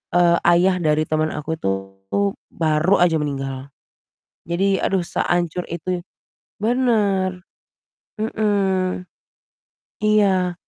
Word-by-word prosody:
eee, 170 -1 +5 0.2
ayah 185 +1 +3
dari 155 0 +2
teman 155 0 0
aku 150 +2 -4
itu - - -1 0.9
baru 160 +4 +2
aja 165 -2 +3
meninggal, 135 -2 -4 0.8
jadi 190 +3 0
aduh 190 -2 +1
sehancur 175 0 -1
itu 175 +1 -3 0.6
bener. 210 -6 +1 0.8
Mhm. 195 -4 0 1.0
Iya. 195 -4 +3
180 Hz, 90 wpm, -21 LUFS, 160-195 Hz, 1.0 s, eee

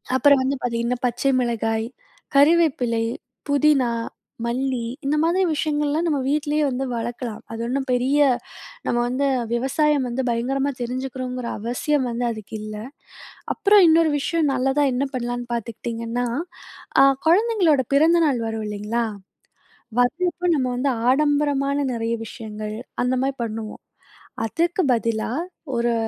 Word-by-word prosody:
அப்பறம் 280 0 +5
வந்து 275 +2 0
பாத்தீங்கன்னா, 235 0 -1
பச்சை 250 +3 +1
மிளகாய், 225 -2 -1 0.5
கறிவேப்பிலை, 275 -7 +3 0.4
புதினா, 285 -3 +3 0.5
மல்லி 250 0 -1 0.2
இந்த 290 - +1
மாதிரி 350 +3 +2
விஷயங்கள்லாம் 300 +2 0
நம்ம 295 -4 +1
வீட்லயே 300 +1 +1
வந்து 265 0 -2
வளக்கலாம். 235 -1 -4
அது 225 0 -5
ஒண்ணும் 265 +3 -1
பெரிய 255 +4 +2 0.7
நம்ம - - 0
வந்து 255 +3 0 0.3
விவசாயம் 270 +3 +1
வந்து 245 +2 -2
பயங்கரமா 270 +4 0
தெரிஞ்சுக்கிறோங்கற 255 0 -4
அவசியம் 250 +5 -1
வந்து 240 +1 -2
அதுக்கு 220 -1 -7
இல்ல. 215 0 -6 0.8
அப்பறம் 410 -1 +5
இன்னொரு 320 -1 +5
விஷயம் 315 0 +1
நல்லதா 270 +3 +2
என்ன 270 +3 0
பண்ணலான்னு 245 -1 -3
பாத்துக்ட்டீங்கன்னா, 230 +1 -3 0.8
அ - - +8 0.2
குழந்தைங்களோட 360 - +4
பிறந்த 325 +4 +5
நாள் 275 -5 +1
வரும் 220 -1 -3
இல்லைங்களா, 210 +3 -2 1.0
வர்றப்போ 345 +7 0
நம்ம 260 -3 0
வந்து 270 +2 +1 0.2
ஆடம்பரமான 285 0 +2 0.2
நிறையா 230 0 -1
விஷயங்கள் 215 -1 -6 0.3
அந்த 250 +1 +1
மாரி 270 0 -1
பண்ணுவோம். 220 -1 -6 0.6
அதுக்கு 340 - 0
பதிலா 225 -1 -1 0.5
ஒரு 235 0 +1
255 Hz, 120 wpm, -23 LUFS, 235-290 Hz, 1.0 s, அ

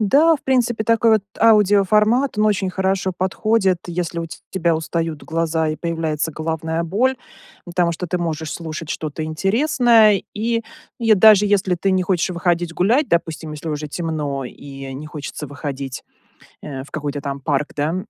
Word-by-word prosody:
Да, 290 +10 +5
в - - -22
принципе 240 -4 +1
такой, 230 0 +3
вот, 215 - +3 0.2
аудиоформат- 210 +3 +4
он 215 - +4
очень 205 -2 +1
хорошо 190 0 0
подходит, 195 0 +1
если 175 -1 -3
у 165 - -4
те 160 -1 -10
тебя 170 -3 +1
устают 160 -1 -3
глаза 160 -1 0
и 155 - -2
появляется 160 -2 -2
головная 160 +1 -2
боль. 240 +10 +1 0.5
Потому 175 -1 0
что 175 +2 -5
ты 180 +1 -1
можешь 160 -2 -3
слушать 160 -1 -6
что-то 155 0 -4
интересное. 220 - +3
И, 230 +2 -1 0.4
и 225 -2 +5
даже 210 0 +6
если 195 -3 +2
ты 195 +3 0
не 185 0 +2
хочешь 180 -1 0
выходить 175 -1 0
гулять- 240 - +2
допустим, 160 -2 -1
если 150 +2 -6
уже 150 0 -3
темно 150 -4 -3
и 135 +1 -9
не 150 +3 -7
хочется 150 0 -7
выходить, 140 -2 -6 0.6
э, 135 -3 -6
в 140 - -16
какой-то 145 -1 -4
там 140 -1 -4
парк, 145 +1 0
да- 150 +3 -1
170 Hz, 165 wpm, -20 LUFS, 155-210 Hz, 0.6 s, даже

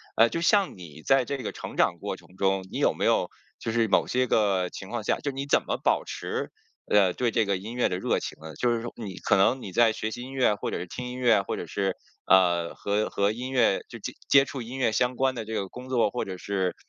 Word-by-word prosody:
呃， 115 +1 +6
就 165 - -2
像 195 - +2
你 80 -4 -11
在 135 -2 +3
这 140 +3 -3
个 125 - -4
成 - - -8
长 - - +2
过 - - -4
程 90 - -18
中， 95 0 +1
你 - - -4
有 - - +3
没 - - -2
有 - - +2 0.3
就 115 - -4
是 115 -1 +2
某 - - +3
些 125 0 +1
个 95 -5 +2
情 95 - -9
况 120 -3 -3
下， - - +1
就 140 - -3
你 135 +1 -5
怎 - - +3
么 - - -1
保 - - +2
持， - - -4 0.3
呃， 100 -3 +4
对 120 +2 0
这 115 - +2
个 100 -1 0
音 105 +5 -7
乐 125 0 +1
的 90 - -2
热 - - 0
情 - - -6
呢？ 80 0 -9
就 120 -1 +1
是 115 - -4
说 120 - -6
你 100 -5 -7
可 100 - +2
能 110 +7 +3
你 95 - -6
在 115 +3 +4
学 110 0 -3
习 120 - -6
音 130 +2 -8
乐 130 -5 +3
或 - - -4
者 - - -3
是 - - -4
听 125 +8 -6
音 125 0 -6
乐， 120 -5 +4
或 95 - -4
者 - - -5
是， 95 -2 -1 0.3
呃， 85 -3 +3
和 105 +1 -1
和 100 +1 +1
音 125 +3 -5
乐 120 -6 +3
就 115 - -8 0.3
接 135 -1 +7
触 135 -1 -6
音 120 +3 -7
乐 125 -4 +2
相 125 +2 +1
关 130 0 +1
的 115 -2 -5
这 110 - -6
个 100 -3 -2
工 125 +5 -10
作 120 -5 +2
或 - - -3
者 95 -1 -6
是 95 -1 -2
110 Hz, 290 characters per minute, -27 LUFS, 95-125 Hz, 0.3 s, 接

